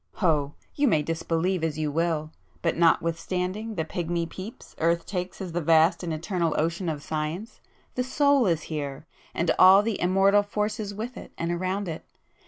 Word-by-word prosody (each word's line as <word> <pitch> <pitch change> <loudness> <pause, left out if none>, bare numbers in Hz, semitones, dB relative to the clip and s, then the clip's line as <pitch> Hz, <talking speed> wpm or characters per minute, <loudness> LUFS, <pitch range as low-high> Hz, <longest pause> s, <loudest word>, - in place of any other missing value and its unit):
Oh, 150 -6 +2 0.2
you 290 0 +2
may 155 - +3
disbelieve 165 +2 -1
as 155 -2 -1
you 155 -1 -1
will,—but 165 +1 -2
notwithstanding 180 +6 0
the 160 -3 -1
pigmy 170 0 -2
peeps 195 +9 -9
earth 170 +1 +1
takes 180 -2 -4
at 180 -3 -5
the 175 - 0
vast 160 +2 +4
and 175 -2 -3
eternal 165 +1 -1
ocean 170 +3 0
of 150 -2 -4
Science, 160 +10 -4 0.3
the 250 - -1
Soul 280 -1 +3
is 165 -3 +1
here, 145 -2 -5 0.3
and 170 - +1
all 190 +2 +8
the 225 -2 -2
immortal 195 +3 +4
forces 210 +1 -2
with 225 +5 -6
it - - -10
and 170 +1 -2
around 185 +3 -2
it! 160 -2 -5
170 Hz, 170 wpm, -26 LUFS, 160-200 Hz, 0.3 s, all